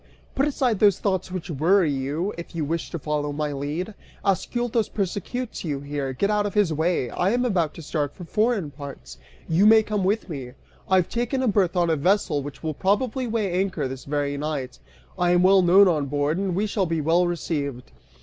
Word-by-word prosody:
Put 275 +2 +1
aside 255 -7 0
those 205 -3 +5
thoughts 190 -2 -1
which 180 -1 -5
worry 165 +3 +3
you, 145 +9 -2
if 170 0 -9
you 160 -3 -1
wish 165 +2 -3
to - - -4
follow 150 -1 -2
my 150 0 -2
lead. 150 +9 -4 0.3
Ascyltos 230 +3 0
persecutes 210 +5 -3
you 145 -5 -2
here; 140 -1 -3
get 200 +11 0
out 210 -1 +1
of 200 - -7
his 200 -6 +3
way. 160 -5 0
I 180 - +1
am 245 +3 +1
about 175 -9 0
to 165 - -9
start 145 -2 -2
for 180 - -9
foreign 210 -3 0
parts, 135 - -10 0.3
you 180 +6 +4
may 220 0 +7
come 210 -2 -1
with 205 +4 0
me. 135 -7 -6 0.4
I 190 - +4
have 185 -2 +3
taken 245 +3 -1
a - - +1
berth 195 -4 +2
on 170 -2 +3
a - - +3
vessel 170 -1 +1
which 145 +3 -9
will 160 -1 -2
probably 240 - 0
weigh 220 -4 -1
anchor 180 -5 -1
this 130 0 -8
very 145 0 -1
night. 145 -3 -4 0.4
I 175 0 +3
am 175 0 +4
well 190 +1 +6
known 190 +3 +6
on 150 -5 +1
board, 145 +4 0
and 195 -3 -1
we 200 +3 +1
shall 200 -3 0
be 165 -1 -1
well 165 +4 +3
received.) 145 - -3
175 Hz, 210 wpm, -24 LUFS, 145-200 Hz, 0.4 s, may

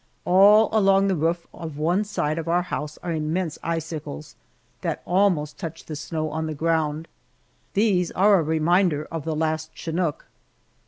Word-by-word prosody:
All 205 +4 +6
along 195 -2 +4
the 190 - +2
roof 165 +2 0
of 160 -4 -7
one 175 +7 +1
side 160 -6 -2
of 165 - -6
our 175 +1 +2
house 150 -4 -5
are 175 - -3
immense 160 +2 -2
icicles 160 - -5 0.5
that - - -3
almost 175 -6 +1
touch 165 -3 -7
the 155 - -6
snow 155 +1 -3
on 160 +1 -2
the 155 - -4
ground. 160 0 0 0.7
These 195 -4 +2
are 200 +1 +5
a - - 0
reminder 160 0 +2
of 165 -3 -5
the 160 -1 -2
last 155 0 -1
chinook! 165 -2 -2
165 Hz, 160 wpm, -24 LUFS, 155-180 Hz, 0.7 s, All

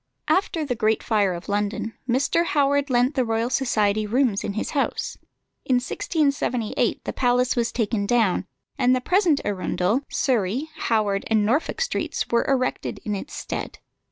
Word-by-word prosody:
After 335 -4 +1
the 265 - -1
Great 220 -1 +1
Fire 205 -4 +2
of 170 - -9
London, 205 +2 -2 0.2
Mr. 275 +7 +2
Howard 285 -3 +1
lent 250 +2 +2
the 260 - +1
Royal 225 +1 -1
Society 215 -5 +1
rooms 235 -2 +1
in 200 - -3
his 215 - -3
house. 285 -3 -1 0.5
In 255 - +2
1678 255 - 0
the - - -3
palace 250 0 +2
was 235 -1 0
taken 215 -3 -1
down, 215 -5 +2 0.3
and 255 0 +4
the - - +1
present 345 +1 +2
Arundel, 195 +3 0
Surrey, 250 +3 0
Howard, 210 -7 0
and 215 -2 +2
Norfolk 290 - 0
streets - - -1
were 235 - +2
erected 255 -2 -1
in 210 - -1
its 195 - -6
stead. - - -5
240 Hz, 155 wpm, -24 LUFS, 210-275 Hz, 0.5 s, and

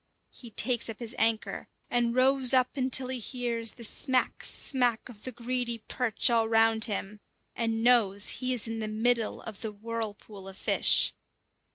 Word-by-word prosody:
He 240 - -11
takes 235 +1 +2
up 220 - -7
his 235 -1 -4
anchor, 225 -1 -1 0.2
and 240 -1 0
rows 260 0 +4
up 255 +1 +1
until 260 -1 +2
he 260 -1 -2
hears 235 -1 -3
the 235 - -12
smack, 255 +3 0
smack 245 -4 0
of 220 -5 -13
the 255 - -4
greedy 240 -1 -3
perch 235 -4 +1
all 225 -1 +2
round 225 0 +4
him, 210 -1 -5 0.4
and 225 -1 -2
knows 210 -5 +3
he 255 0 -2
is 240 -3 0
in 225 0 -5
the 215 - -4
middle 225 +1 0
of 215 -3 -9
the 220 - -4
whirlpool 210 -2 -7
of 195 0 -9
fish. - - +4
230 Hz, 170 wpm, -28 LUFS, 220-250 Hz, 0.4 s, rows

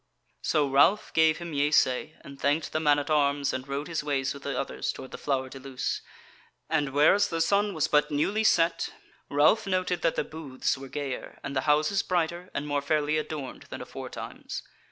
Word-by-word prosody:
So 150 -2 +2
Ralph 160 +10 +3
gave 160 -1 +4
him 170 -2 -7
yeasay 145 0 +2
and 140 0 -12
thanked 145 +3 +1
the 155 - 0
man 150 -2 +4
at 145 +1 -3
arms 140 -1 +2
and 130 +1 -4
rode 140 +2 -3
his 165 -3 -2
ways 140 -2 0
with 140 - -10
the 140 -2 -3
others - - -2
toward 130 - -10
the - - -6
Flower 135 -2 -1
de 135 +1 -10
Luce, 130 -1 -3 0.7
and 150 -3 +2
whereas 150 +9 +4
the 165 - -3
sun 200 +3 +2
was 155 - +1
but 150 0 +3
newly 195 +9 +1
set, 170 -5 +3 0.4
Ralph 155 +10 +4
noted 185 -2 0
that 165 - +1
the - - 0
booths 150 -5 -3
were 135 0 -9
gayer 140 -2 -5
and 140 - -5
the 130 +3 0
houses 155 +6 +3
brighter 175 0 -1
and 140 - -2
more 145 -1 0
fairly 150 +1 +1
adorned 150 -3 -6
than - - -6
aforetimes. - - -7
150 Hz, 195 wpm, -28 LUFS, 140-165 Hz, 0.7 s, gave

